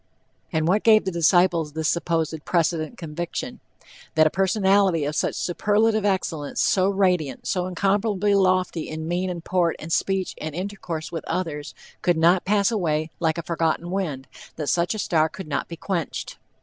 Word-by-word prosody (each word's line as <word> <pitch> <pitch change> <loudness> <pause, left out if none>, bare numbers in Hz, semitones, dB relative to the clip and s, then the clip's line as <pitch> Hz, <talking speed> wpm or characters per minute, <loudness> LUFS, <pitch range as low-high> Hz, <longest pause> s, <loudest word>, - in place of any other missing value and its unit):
And 160 -2 0
what 200 +4 +3
gave 215 -3 +5
the 190 - -1
disciples 170 -2 +3
this 160 0 -1
supposed 165 -2 -1
"precedent 165 +3 0
conviction?" 170 0 -5 0.6
"That 155 0 +5
a 155 - +3
personality 190 -4 +2
of 150 +1 -2
such - - 0
superlative 210 +4 +1
excellence, 170 -7 -1
so 190 0 +3
radiant, 180 -9 0
so 180 -1 -1
incomparably 200 +2 +1
lofty 185 -4 +1
in 155 0 -5
mien 180 +2 -1
and 170 -2 -6
port 175 -3 +1
and 165 +1 -5
speech 195 -1 0
and 155 -1 -5
intercourse 180 -4 -5
with 165 -2 -4
others, 150 -5 -3 0.3
could 175 -2 +2
not 170 +3 +4
pass 200 +2 +2
away 160 -7 -1
like 160 -1 +1
a 170 - -3
forgotten 165 +1 -1
wind, 155 -9 -3 0.3
that 150 -3 -3
such 175 +4 +1
a - - -4
star 160 -5 +2
could 180 +2 -9
not 145 - -2
be 170 - -7
quenched." 175 -3 -4
175 Hz, 170 wpm, -24 LUFS, 160-190 Hz, 0.6 s, gave